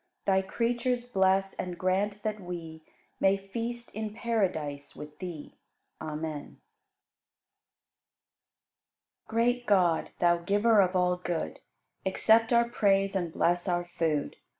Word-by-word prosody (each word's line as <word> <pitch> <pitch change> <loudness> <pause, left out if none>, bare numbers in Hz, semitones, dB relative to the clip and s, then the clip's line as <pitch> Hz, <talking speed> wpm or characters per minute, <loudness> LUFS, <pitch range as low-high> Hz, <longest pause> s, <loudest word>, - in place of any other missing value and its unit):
Thy 190 -1 +3
creatures 240 +4 -1
bless 195 -4 +2
and 180 -1 -5
grant 200 +3 0
that 215 -1 -2
we 170 -3 -7 0.4
May 195 +1 +4
feast 235 +5 -5
in 215 0 -4
paradise 170 -12 -2
with 150 0 -10
Thee. 175 -5 -7 0.5
Amen. 155 -1 -5 2.7
43. - - -40
Great 240 +2 +1
God, 180 -5 +3
Thou 175 -1 +4
Giver 205 +5 +3
of 185 0 +1
all 180 0 +2
good, 175 -2 -3 0.4
Accept 225 +4 +3
our 235 0 +4
praise 195 -4 +2
and 175 -3 -1
bless 175 +3 +1
our 175 -1 0
food. 160 -4 -1
190 Hz, 120 wpm, -29 LUFS, 175-220 Hz, 2.7 s, May